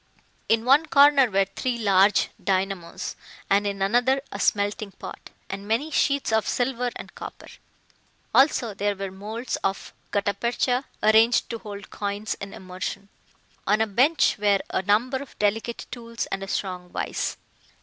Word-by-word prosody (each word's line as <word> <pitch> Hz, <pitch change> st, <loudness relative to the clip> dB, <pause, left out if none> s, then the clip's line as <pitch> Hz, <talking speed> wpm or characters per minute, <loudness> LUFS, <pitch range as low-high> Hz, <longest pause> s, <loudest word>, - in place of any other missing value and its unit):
In 225 Hz, 0 st, +3 dB
one 285 Hz, +5 st, +5 dB
corner 280 Hz, -3 st, +6 dB
were 195 Hz, -1 st, +2 dB
three 235 Hz, +6 st, -3 dB
large 200 Hz, -2 st, +4 dB
dynamos, 190 Hz, -3 st, -2 dB, 0.4 s
and 200 Hz, +1 st, +4 dB
in 195 Hz, -1 st, -2 dB
another 245 Hz, +6 st, +3 dB
a 200 Hz, -, -6 dB
smelting 205 Hz, 0 st, 0 dB
pot, -, -, -10 dB, 0.2 s
and 195 Hz, +1 st, -6 dB
many 245 Hz, +9 st, 0 dB
sheets 280 Hz, -4 st, +1 dB
of 220 Hz, -2 st, +2 dB
silver 245 Hz, 0 st, 0 dB
and -, -, -9 dB
copper. -, -, -9 dB, 0.9 s
Also, 260 Hz, -5 st, +4 dB
there 205 Hz, +1 st, -1 dB
were 195 Hz, -1 st, -5 dB
moulds 215 Hz, +6 st, -4 dB
of 195 Hz, 0 st, -3 dB, 0.2 s
gutta 200 Hz, 0 st, 0 dB
percha 245 Hz, +4 st, 0 dB, 0.2 s
arranged 220 Hz, +3 st, +4 dB
to 230 Hz, -, -4 dB
hold 205 Hz, -1 st, -9 dB
coins 205 Hz, +1 st, -3 dB
in 195 Hz, 0 st, -6 dB
immersion. 185 Hz, +2 st, -6 dB, 0.6 s
On 210 Hz, +2 st, +3 dB
a 220 Hz, -, +3 dB
bench 250 Hz, +6 st, +3 dB
were 205 Hz, -1 st, +3 dB
a -, -, 0 dB
number 220 Hz, +7 st, +2 dB
of 275 Hz, -1 st, -10 dB
delicate 220 Hz, +3 st, -1 dB
tools 230 Hz, -1 st, -5 dB
and 195 Hz, -, -2 dB
a 195 Hz, -, -5 dB
strong 180 Hz, -3 st, -3 dB
vice. -, -, -3 dB
210 Hz, 155 wpm, -25 LUFS, 195-245 Hz, 0.9 s, corner